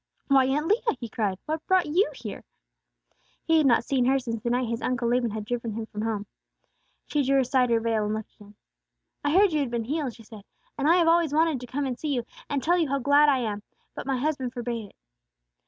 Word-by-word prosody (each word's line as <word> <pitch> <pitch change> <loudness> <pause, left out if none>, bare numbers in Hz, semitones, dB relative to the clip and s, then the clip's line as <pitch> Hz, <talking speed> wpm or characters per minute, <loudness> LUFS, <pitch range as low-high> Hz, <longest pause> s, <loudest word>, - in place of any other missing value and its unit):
"Why, 270 -1 +5
Aunt 290 +3 0
Leah!" 430 - +1
he 235 - -5
cried. 210 -4 -2
"What 315 0 -3
brought 375 -1 +3
you 360 +9 +2
here?" - - -8 1.0
He 325 -1 +3
had 300 - +3
not 235 -2 +4
seen 260 -3 +1
her 265 +2 +3
since 230 -4 -4
the 235 - -2
night 245 0 0
his 230 +1 -3
Uncle 240 -2 -1
Laban 240 0 +1
had 215 0 -5
driven 235 -1 -3
him 225 +1 -4
from 210 -1 -7
home. 215 -2 -2 0.8
She 295 - 0
drew 275 0 +3
aside 255 -1 +2
her 230 -1 +3
veil, 225 -2 0
and 210 +1 -1
looked 220 -1 -7
at - - -27
him. 205 - -18 0.7
"I 290 - +1
heard 385 +1 +4
you 305 - +2
had 275 -4 -1
been 235 -1 -2
healed," 280 -2 -2
she 225 - -14
said, 215 -1 -12 0.3
"and 285 +2 +1
I 340 - +6
have 345 -2 +3
always 330 -3 +3
wanted 320 -3 +2
to 250 - -8
come 280 +3 -2
and 250 -2 -4
see 295 -3 -1
you, 240 - -1 0.3
and 280 -2 -1
tell 350 +2 +3
you 320 -5 +1
how 275 - +1
glad 285 +3 +4
I 265 -3 +2
am; 210 -3 -3 0.3
but - - -7
my 270 -1 0
husband 260 -3 -2
forbade 235 -4 -4
it. - - -26
255 Hz, 245 wpm, -26 LUFS, 230-295 Hz, 1.0 s, I